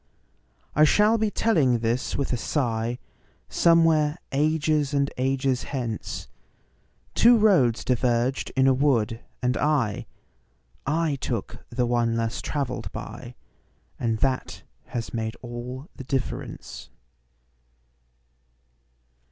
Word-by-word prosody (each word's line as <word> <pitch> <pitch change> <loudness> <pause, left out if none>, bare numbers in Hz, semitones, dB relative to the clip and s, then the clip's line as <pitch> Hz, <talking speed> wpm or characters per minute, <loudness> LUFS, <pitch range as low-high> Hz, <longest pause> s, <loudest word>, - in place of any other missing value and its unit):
I 150 - +5
shall 210 +8 +4
be 220 0 +2
telling 155 - +2
this 115 +2 -1
with 140 -2 -1
a 120 -2 -1 0.5
sighSomewhere 165 -2 +4
ages 150 0 +1
and 140 0 +1
ages 130 0 0
hence:Two 135 - -1
roads 130 - +3
diverged 125 +1 +1
in 130 0 +4
a 135 - +5
wood, 120 -5 +1 0.2
and 125 +1 +2
I—I 145 - -2
took 120 -5 -4
the 120 +1 0
one 120 -1 +1
less 115 +1 -2
traveled 135 -4 -3
by, - - -8 0.6
And 115 -2 0
that 130 -2 -1 0.2
has 115 -2 -5
made 110 -1 -2
all 125 +4 -6
the 135 - -8
difference. 130 0 -4
130 Hz, 100 wpm, -25 LUFS, 120-150 Hz, 0.6 s, I